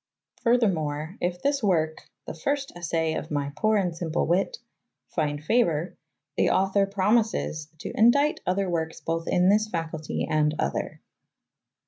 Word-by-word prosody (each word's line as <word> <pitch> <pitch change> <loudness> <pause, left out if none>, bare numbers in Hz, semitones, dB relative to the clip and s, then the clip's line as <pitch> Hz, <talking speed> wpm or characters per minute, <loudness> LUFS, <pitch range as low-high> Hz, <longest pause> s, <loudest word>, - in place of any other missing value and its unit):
Furthermore, 175 - +1
if 175 0 -2
this 280 0 +1
work, 160 -6 0 0.2
"the - - -5
fyrste 275 - -2
assay 165 -2 -1
of - - -4
my 145 -1 -2
pore 215 +7 +2
and 185 -3 +1
symple 165 -1 -1
wyt,"" 190 - +1 0.5
find 150 -2 -2
favor, 170 -5 +1 0.4
the - - +3
author 195 +1 +2
promises 200 -6 +1
"to - - -6
endight 280 +7 +4
other 190 +2 +1
werkes 160 -2 -2
both 165 0 -2
in 180 +1 +3
this 215 +1 +3
facultye 160 -4 -3
and 150 0 +1
other." 70 - -2
175 Hz, 140 wpm, -26 LUFS, 155-215 Hz, 0.5 s, endight